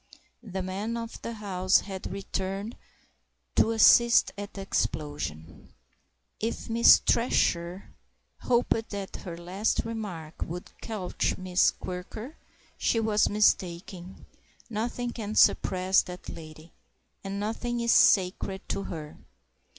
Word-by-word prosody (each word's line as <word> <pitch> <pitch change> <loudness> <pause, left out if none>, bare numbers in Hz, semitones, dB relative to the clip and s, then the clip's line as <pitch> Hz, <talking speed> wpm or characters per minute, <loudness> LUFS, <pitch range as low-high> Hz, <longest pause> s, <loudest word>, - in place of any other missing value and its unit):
The 190 -5 -5
man 200 +5 -3
of 230 0 -7
the 230 - -5
house 190 -3 +2
had 190 -2 -7
returned 195 +2 -4 0.8
to - - +4
assist 235 +1 +6
at 200 0 -8
the 195 - -5
explosion. 145 - -4 0.6
If 225 +1 -3
Miss 235 +1 +8
Thresher 180 -6 0 0.5
hoped 235 -2 +1
that 200 -2 -6
her 170 -2 -8
last 185 +7 -1
remark 195 -9 -6
would 175 +2 -5
quelch 210 -5 -2
Miss 185 0 +3
Quirker, 215 - -7 0.4
she 230 - +2
was 215 -1 +2
mistaken 185 -3 0 0.5
nothing 240 +2 -2
can 215 -2 -5
suppress 185 -2 +4
that 180 -1 -9
lady, 155 0 -11 0.5
and 195 0 -4
nothing 235 +3 -2
is 235 0 +2
sacred 190 0 +3
to 195 - -2
her. 155 -3 -7
195 Hz, 115 wpm, -28 LUFS, 180-225 Hz, 0.8 s, Miss